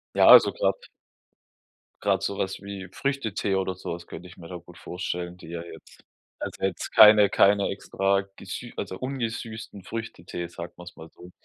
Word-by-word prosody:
Ja, - - +5
also - - +9
grad - - +1 1.3
grad 95 -2 +1
sowas 95 -1 -2
wie 100 -2 -7
Früchtetee 110 -8 -1
oder 95 -1 -1
so 90 - -5
was 85 0 -9
könnte 90 +3 -9
ich 90 - -15
mir 85 - -11
da 90 - -7
gut 85 0 -16
vorstellen, 90 0 -5
die 90 - -13
ja 85 0 -5
jetzt 85 - -14 0.4
also - - -6
jetzt 95 -3 -2
keine 105 -1 +8
keine 100 0 +4
extra 100 0 0
gesü 115 +5 -7
also 95 -2 -5
ungesüßten 115 -5 -5
Früchtetee, 90 -5 -6
sagen 85 0 -8
wir's 90 0 -11
mal 80 - -11
so. 90 +2 -15
95 Hz, 170 wpm, -26 LUFS, 90-105 Hz, 1.3 s, also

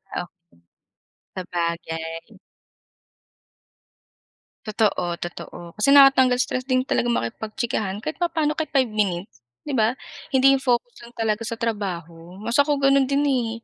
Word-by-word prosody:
Ah - - -1
okey, 175 - -15 1.0
sabagay. 165 -2 -4 2.3
Totoo, 200 -5 0
totoo. 175 0 -8
Kasi 210 +6 +2
nakakatanggal 270 -3 +6
stress 255 0 -1
din 255 0 0
talagang 240 -4 +1
makipagchikahan 215 - -3
kahit 310 +8 -5
papaano 320 -3 0
kahit 315 0 -3
5 265 -4 +3
minutes, 200 - -3 0.2
'di 285 - -2
ba? 220 -2 +3 0.4
Hindi 270 +1 +5
yung 265 - -4
focus 250 - -1
lang 235 - -12
talaga 220 0 0
sa 230 0 -5
trabaho. 180 -5 -4
Mas 230 +3 -3
ako 285 0 +3
gano'n 275 0 +4
din, 280 +2 +1
eh. 250 -5 +1
230 Hz, 130 wpm, -23 LUFS, 180-270 Hz, 2.3 s, nakakatanggal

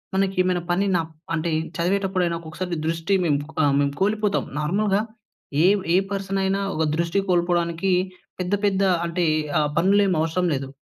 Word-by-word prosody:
మనకేమైనా 185 -2 +1
పని 190 +3 +2
నాప్ 160 -1 -4 0.2
అంటే, 165 +1 -1 0.3
చదివేటప్పుడైనా 185 -1 0
ఒక్కొక్కసారి 170 +2 -5
దృష్టి 165 +4 -1
మేము 145 -3 +2
ప్ - - -12 0.2
ఆహ్, 140 - +3
మేము 140 0 0
కోల్పోతాం. 210 +1 +1 0.2
నార్మల్‌గా 200 +6 +1 0.6
ఏ - - +7 0.3
ఏ - - +5 0.2
పర్సనయినా 195 0 -1 0.2
ఒక 160 - +1
దృష్టి 170 +3 +1
కోల్పోడానికీ 175 +1 +1 0.5
పెద్ద 180 +2 -2
పెద్దా 195 -1 +2 0.2
అంటే, 170 +1 0 0.3
ఆహ్, 150 -1 +1
పనులేం 195 +2 +3
అవసరం 165 +3 0
లేదు. 135 0 -4
180 Hz, 145 wpm, -23 LUFS, 165-195 Hz, 0.6 s, ఏ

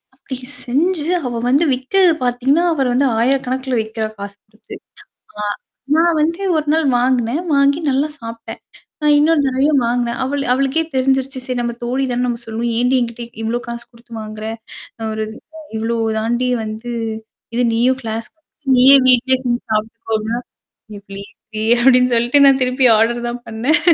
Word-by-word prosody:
அப்டி 260 -1 -8 0.3
செஞ்சு 305 +5 0 0.2
அவ 245 - -3 0.2
வந்து 285 +6 +3
விக்கிறது 335 +7 +2
பாத்தீங்கன்னா, 260 +7 +1
அவர் 265 -5 0
வந்து 270 +2 +2
1000 265 +4 +3
கணக்குல 260 -1 -2
வி்க்கிறா. 220 0 -4
காசு 200 0 -8
குடுத்து 215 +2 -13 0.7
ஆ - - -2 0.5
நான் 335 0 +3
வந்து 335 +5 0 0.2
ஒரு 305 -1 -2
நாள் 320 -1 +1
வாங்குனேன். 250 +3 +1
வாங்கி 280 +2 +3
நல்லா 275 +3 +1
சாப்ட்டேன். 230 0 -8 0.4
அ - - +1
இன்னொரு 305 0 +3
தடவையும் 270 +1 +2
வாங்குனேன். 240 0 -1
அவள் 280 +2 -2
அவளுக்கே 275 +5 0
தெரிஞ்சிருச்சு. 265 0 0
சரி 250 -2 -3
நம்ம 235 0 -2
தோழி 255 +3 -1
தானேன்னு 245 0 -1
நம்ம 235 -1 -2
சொல்லுவோம். 230 +1 -3
"ஏன்டீ 250 +2 +2
என்கிட்ட 235 0 -4 0.2
இவ்வளோ 235 +2 -1
காசு 235 0 -6
குடுத்து 235 0 -17
வாங்குற? 215 0 -8 0.5
நான் 220 -1 -4
ஒரு 220 - -2 0.3
அ - - -10 0.2
இவ்ளோ 230 +1 -1 0.2
தாண்டி 240 +3 -1
வந்து 220 +3 -6 0.6
இது 245 - +1
நீயும் 255 +3 +2
கிளாஸ்க்கு 225 +4 -6
போயி, 295 -2 -11
நீயும் 265 +1 +7
வீட்லயே 255 +1 +4
செஞ்சு 240 -1 -1
சாப்ட்டுக்கோ" 220 +1 -3
அப்டின்னா, 220 +2 -3 0.6
"ஏ - - -10
ப்ளீஸ் 200 0 -9 0.2
டீ" 215 - -2 0.2
அப்டீன்னு 250 -1 +4
சொல்ட்டு 245 +5 +4
நான் 270 -1 +5
திருப்பி 255 0 +3
ஆர்டர் 240 +2 +1
தான் 240 0 -6
பண்ணேன். 245 +9 +1
250 Hz, 165 wpm, -18 LUFS, 230-270 Hz, 0.7 s, நீயும்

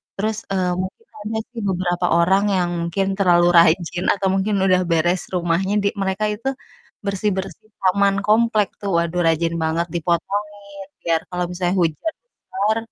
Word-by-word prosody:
terus, 215 +2 -1
eee, 185 -2 +1
mungkin 190 - -7 0.2
ada 220 0 -2
sih 235 - -7
beberapa 175 -1 -1
orang 190 +4 +3
yang 175 -1 0 0.2
mungkin 195 +3 -1
terlalu 175 -2 +4
rajin 170 +1 +3
atau 195 -1 -1
mungkin 195 +2 0
udah 185 -1 +4
beres 170 +2 +2
rumahnya 175 +3 0
di 200 - +2
mereka 195 +2 -1
itu 230 +5 -6 0.6
bersih-bersih 200 +2 -3
taman 195 +1 +3
komplek 215 -1 +3
tuh, 200 - -3
waduh, 170 +1 0
rajin 165 +1 +1
banget, 165 +2 0
dipotongin 170 +4 0 0.6
biar 165 -1 +1
kalau 180 0 -1
misalnya 180 0 -1
hujan 165 - -1
besar 215 - -2
185 Hz, 150 wpm, -21 LUFS, 175-200 Hz, 0.6 s, terlalu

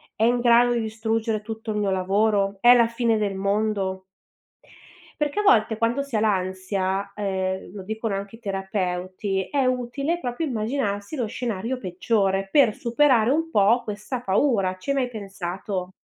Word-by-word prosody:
è 220 - -1
in 240 +1 +3
grado 240 0 +5
di 235 - 0
distruggere 220 0 -2
tutto 220 0 -7
il 210 - -1
mio 200 -2 0
lavoro? 195 +1 +1
È 245 +1 +8
la 235 -2 +5
fine 230 -1 0
del 200 -2 -1
mondo? 200 -1 -1 1.2
Perché 295 +6 0
a - - +3
volte 220 - +4
quando 235 +5 +1
si 280 -4 -6
ha 215 - +3
l'ansia, 190 -1 -1
ehm, 190 -2 -2
lo 200 - -7
dicono 220 +2 -3
anche 200 +2 -5
i 225 - -17
terapeuti, 190 -1 -3
è 275 -2 +1
utile 255 +6 -1
proprio 250 +2 -3
immaginarsi 220 -2 -2
lo 245 -6 -1
scenario 230 +2 -3
peggiore 195 0 0
per 255 -8 +4
superare 240 -1 +3
un 325 +3 0
po' 220 -2 +4
questa 210 +4 -5
paura. 195 -3 +1
Ci 280 +9 -3
hai - - +1
mai 255 -3 0
pensato? 195 -3 -5
215 Hz, 165 wpm, -24 LUFS, 195-240 Hz, 1.2 s, È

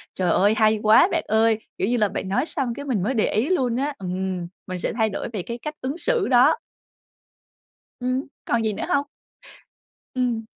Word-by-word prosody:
Trời 180 -2 +1
ơi! 205 +5 +4
Hay 215 -2 +4
quá 220 +10 +7
bạn 330 - 0
ơi! 220 0 +3 0.2
Kiểu 190 - 0
như 245 - +1
là, 210 -2 +3
bạn 190 - -4
nói 250 +9 +1
xong 270 -7 -2
cái 285 +3 -7
mình 235 -10 0
mới 240 +7 0
để 220 - +2
ý 230 - +1
luôn 255 -10 +1
á, 280 +4 -1
ừm, 185 -1 -3 0.2
mình 185 -1 -4
sẽ 180 - -2
thay 220 -2 +1
đổi 200 - -4
về 205 - -2
cái 235 +6 -6
cách 300 +5 -6
ứng 270 +5 -3
xử 470 +2 0
đó. 250 - +5 1.4
Ừm, 255 +2 -1 0.2
còn 235 - +1
gì 215 -1 0
nữa 205 - -4
hông? 285 -5 +2 1.1
Ừm. 245 -3 -1
230 Hz, 205 wpm, -23 LUFS, 210-260 Hz, 1.4 s, quá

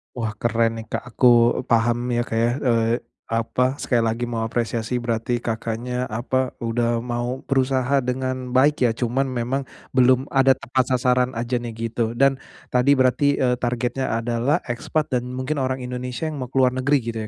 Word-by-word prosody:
Wah, 115 -3 -2
keren 115 0 +1
nih 110 - -8
Kak, - - -4
aku 125 +1 +3 0.4
paham 120 0 +2 0.2
ya 120 - +2
Kak 115 - -4
ya, 115 +1 +2
eee, 115 -2 +2 0.3
apa, 125 +3 0
sekali 125 -4 0
lagi 115 +2 -2
mau 115 -2 -2
apresiasi, 115 +1 -2
berarti 120 +1 -1
Kakaknya 120 +2 -3
apa, 130 +3 -2
udah 115 0 0
mau 120 +1 -3
berusaha 135 0 +1
dengan 130 0 -3
baik 135 -1 +4
ya, - - +1
cuman 125 +3 0
memang 130 +1 -2 0.3
belum 130 0 +4
ada 135 -1 +4
tepat 130 0 0
sasaran 125 0 +1
aja 120 +1 -1
nih, 120 -1 -6 0.2
gitu. 115 0 -1
Dan, 135 +1 +3 0.3
tadi 130 +3 +4
berarti, 130 +2 +3
eee, 125 -2 +1
targetnya 120 +1 -1
adalah 120 +7 0
ekspat 135 +5 -2
dan 125 - -8
mungkin 135 +3 -2
orang 130 0 -2
Indonesia 125 +2 -5
yang 155 -2 -4
mau 130 - -4
keluar 130 -1 +3
negeri 130 +3 +2
gitu 115 0 -4
125 Hz, 170 wpm, -22 LUFS, 115-130 Hz, 0.4 s, baik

